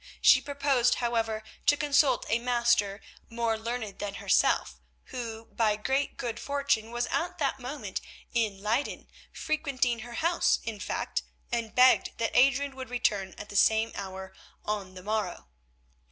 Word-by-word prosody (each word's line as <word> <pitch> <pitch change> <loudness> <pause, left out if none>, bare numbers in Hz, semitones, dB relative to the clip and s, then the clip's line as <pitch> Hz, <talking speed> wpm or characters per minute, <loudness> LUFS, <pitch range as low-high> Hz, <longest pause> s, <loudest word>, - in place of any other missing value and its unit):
She - - +7
proposed, 280 -4 +2
however, 225 -2 -1 0.2
to 290 - +5
consult 285 -3 +3
a 230 - +2
Master 235 -4 +1 0.3
more 230 -1 0
learned 220 -2 -4
than 200 -1 -4
herself, - - +2 0.3
who, 230 -2 -5
by 220 -2 +1
great 265 +6 -1
good 235 -2 -4
fortune, 280 -6 0
was 240 +1 -1
at 355 +2 -1
that 275 -4 -1
moment 265 +4 -5 0.3
in 215 -5 0
Leyden, 230 +7 -1 0.2
frequenting 280 -6 -1
her 240 +2 -8
house 335 +7 +2
in 225 -3 -5
fact, - - -2 0.3
and 230 -2 -2
begged 255 +1 +5
that 230 -1 0
Adrian 275 +2 +4
would 260 0 -6
return 205 -6 0
at 210 - -8
the 205 - -9
same 220 +2 +4
hour 190 -1 -7 0.3
on 200 -3 -3
the 185 - -10
morrow. 210 - -3
235 Hz, 150 wpm, -29 LUFS, 215-265 Hz, 0.3 s, She